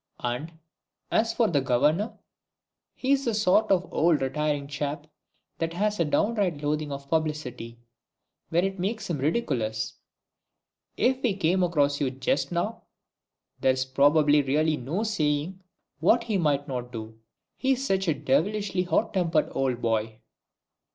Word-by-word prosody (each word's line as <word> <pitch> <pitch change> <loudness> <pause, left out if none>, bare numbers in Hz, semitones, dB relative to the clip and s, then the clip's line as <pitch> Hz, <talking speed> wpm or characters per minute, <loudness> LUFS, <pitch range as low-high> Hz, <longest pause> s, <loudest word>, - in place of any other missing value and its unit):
And, 125 +7 -3 0.6
as 225 +1 +2
for 230 -1 +2
the 145 -7 +1
Governor, 150 - +1 0.8
he's 275 +1 +1
the 230 -3 0
sort 210 0 +3
of 185 -1 +2
old 165 -1 +3
retiring 145 +1 -1
chap 145 +1 -4 0.5
that 165 0 -2
has 210 +3 0
a 170 - +3
downright 185 -2 0
loathing 150 0 -1
of 140 0 -6
publicity, 150 -7 -2 0.7
when 175 +3 +2
it 195 -1 -3
makes 200 +1 -2
him 150 - -2
ridiculous. 120 - -1 1.0
If 260 +1 +2
he 225 -6 +1
came 185 0 +1
across 145 -5 +1
you 135 - +2
just 135 +2 -1
now, 190 +7 -2 0.8
there's 130 0 +1
really 150 +1 +4
no 150 - -3
saying 165 -3 -1 0.4
what 225 +9 +4
he 220 -3 -2
mightn't 140 -5 -1
do. 110 -1 -8 0.4
He's 265 0 0
such 195 -5 0
a 160 - +2
devilishly 180 +8 0
hot 185 +5 0
tempered 170 -5 +1
old 130 -3 -1
boy!" 110 -1 0
155 Hz, 135 wpm, -26 LUFS, 140-195 Hz, 1.0 s, really